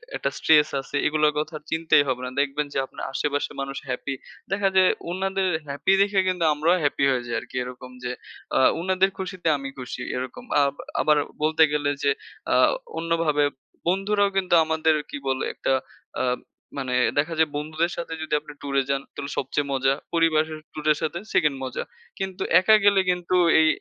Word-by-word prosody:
একটা -, -, -1 dB
স্ট্রেস 150 Hz, -1 st, +5 dB
আছে 135 Hz, -, -9 dB
এগুলার 150 Hz, 0 st, +2 dB
কথা 155 Hz, +1 st, -4 dB, 0.2 s
চিন্তাই 160 Hz, -2 st, +4 dB
হবে 125 Hz, -1 st, -1 dB
না। -, -, -3 dB
দেখবেন 145 Hz, +1 st, -1 dB
যে -, -, -2 dB
আপনার -, -, -10 dB
আশেপাশের 145 Hz, +1 st, -1 dB
মানুষ 135 Hz, 0 st, -5 dB
হ্যাপি, 130 Hz, +2 st, -3 dB, 0.4 s
দেখা 195 Hz, 0 st, +2 dB
যায় 185 Hz, -1 st, +6 dB, 0.2 s
উনাদের 190 Hz, +1 st, -1 dB, 0.2 s
হ্যাপি 145 Hz, +7 st, +1 dB
দেখে 200 Hz, 0 st, +3 dB
কিন্তু 180 Hz, -2 st, 0 dB
আমরাও 160 Hz, +4 st, +2 dB
হ্যাপি 145 Hz, -1 st, +1 dB
হয়ে 125 Hz, -2 st, 0 dB
যাই 120 Hz, -, -2 dB
আরকি। -, -, -13 dB
এরকম 125 Hz, 0 st, -9 dB
যে 125 Hz, -, -2 dB, 0.5 s
আ -, -, +4 dB, 0.2 s
উনাদের 190 Hz, +1 st, +2 dB
খুশিতে 185 Hz, -2 st, -4 dB
আমি 135 Hz, -1 st, -6 dB
খুশি 125 Hz, 0 st, -6 dB, 0.2 s
এরকম। 130 Hz, -, -6 dB, 0.2 s
আ -, -, +5 dB, 0.4 s
আবার 150 Hz, -1 st, +4 dB, 0.3 s
বলতে 160 Hz, +1 st, +4 dB
গেলে 145 Hz, -1 st, +1 dB
যে, 140 Hz, -, +4 dB, 0.4 s
আ -, -, +4 dB, 0.5 s
অন্যভাবে 165 Hz, -3 st, +1 dB, 0.5 s
বন্ধুরাও 200 Hz, +2 st, +2 dB
কিন্তু 185 Hz, -2 st, +1 dB
আমাদের 160 Hz, 0 st, +2 dB
কি -, -, -5 dB
বলে? 130 Hz, 0 st, 0 dB
একটা -, -, -2 dB, 0.5 s
আ -, -, +1 dB, 0.5 s
মানে 130 Hz, -2 st, -2 dB, 0.2 s
দেখা 155 Hz, +3 st, +1 dB
যায়, 160 Hz, -1 st, +3 dB
বন্ধুদের 155 Hz, +3 st, -1 dB
সাথে 170 Hz, -1 st, -4 dB
যদি 155 Hz, -, -4 dB
আপনি 150 Hz, 0 st, -12 dB
ট্যুর 140 Hz, -1 st, -4 dB
এ -, -, -3 dB
যান 140 Hz, 0 st, +1 dB
তাহলে 140 Hz, 0 st, -6 dB
সবচেয়ে 140 Hz, +2 st, -1 dB
মজা, 135 Hz, 0 st, +2 dB, 0.2 s
পরিবারের 160 Hz, -2 st, +2 dB
ট্যুর 155 Hz, -1 st, -7 dB
এর 150 Hz, -, +2 dB
সাথে 170 Hz, +2 st, -2 dB
2nd 150 Hz, -4 st, +2 dB
মজা 130 Hz, -2 st, -3 dB, 0.4 s
কিন্তু 190 Hz, -1 st, -4 dB, 0.2 s
একা 215 Hz, +4 st, +6 dB
গেলে 200 Hz, -1 st, +6 dB
কিন্তু 180 Hz, 0 st, 0 dB, 0.2 s
এই 160 Hz, -, +5 dB
155 Hz, 180 wpm, -24 LUFS, 140-180 Hz, 0.5 s, যায়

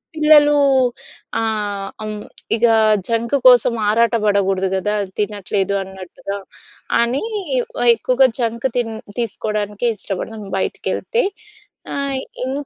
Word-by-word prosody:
పిల్లలు 300 Hz, -1 st, +6 dB, 0.8 s
ఆహ్, 205 Hz, -3 st, -2 dB, 0.2 s
అవును. 210 Hz, -1 st, -6 dB, 0.3 s
ఇక 230 Hz, +1 st, +2 dB, 0.4 s
జంక్ 230 Hz, +3 st, 0 dB
కోసం 245 Hz, -1 st, +6 dB, 0.2 s
ఆరాటపడకూడదు 205 Hz, -4 st, +2 dB
కదా! 210 Hz, +2 st, -1 dB, 0.2 s
తినట్లేదు 200 Hz, -1 st, -1 dB
అన్నట్టుగా. 190 Hz, +1 st, -7 dB, 0.6 s
అని 240 Hz, +4 st, 0 dB, 0.7 s
ఎక్కువగా 255 Hz, +3 st, +3 dB
జంక్ 235 Hz, +1 st, 0 dB
తిన్ 230 Hz, -2 st, -1 dB, 0.3 s
తీసుకోవడానికే 210 Hz, -1 st, -2 dB
ఇష్టపడతాం 210 Hz, +2 st, -5 dB
బయటికెళ్తే. 470 Hz, -, -1 dB, 0.7 s
ఆ -, -, -3 dB, 0.5 s
ఇం 260 Hz, -, -2 dB
215 Hz, 90 wpm, -19 LUFS, 200-240 Hz, 0.8 s, పిల్లలు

